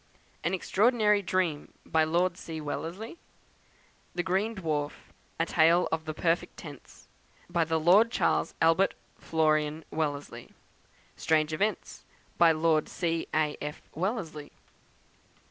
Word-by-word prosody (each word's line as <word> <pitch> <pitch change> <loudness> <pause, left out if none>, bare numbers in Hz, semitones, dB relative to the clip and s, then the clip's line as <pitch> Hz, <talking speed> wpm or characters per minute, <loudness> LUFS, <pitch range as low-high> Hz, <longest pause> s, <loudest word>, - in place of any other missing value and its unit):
"An 170 +4 +1
Extraordinary 210 +2 +2
Dream," 175 -5 -1
by 160 0 +2
Lord 170 +2 +1
C. 165 -3 -7
Wellesley. 165 - -5 1.0
"The 175 - 0
Green 195 +5 0
Dwarf, 150 -6 -2 0.5
a 165 - +2
Tale 170 +2 +4
of 160 0 -2
the 155 - -4
Perfect 165 +1 0
Tense," - - -12 0.4
by 170 -2 +2
the 160 0 0
Lord 190 +8 +5
Charles - - 0
Albert 165 +4 +3 0.2
Florian 155 -1 0
Wellesley. 145 -2 -4 0.6
"Strange 155 -1 +1
Events," 205 +7 -2 0.4
by 170 -1 +7
Lord 155 -1 +1
C. 165 -2 -2
A. 155 -1 +1
F. 150 0 -6
Wellesley. 165 -5 -3
165 Hz, 120 wpm, -29 LUFS, 155-185 Hz, 1.0 s, by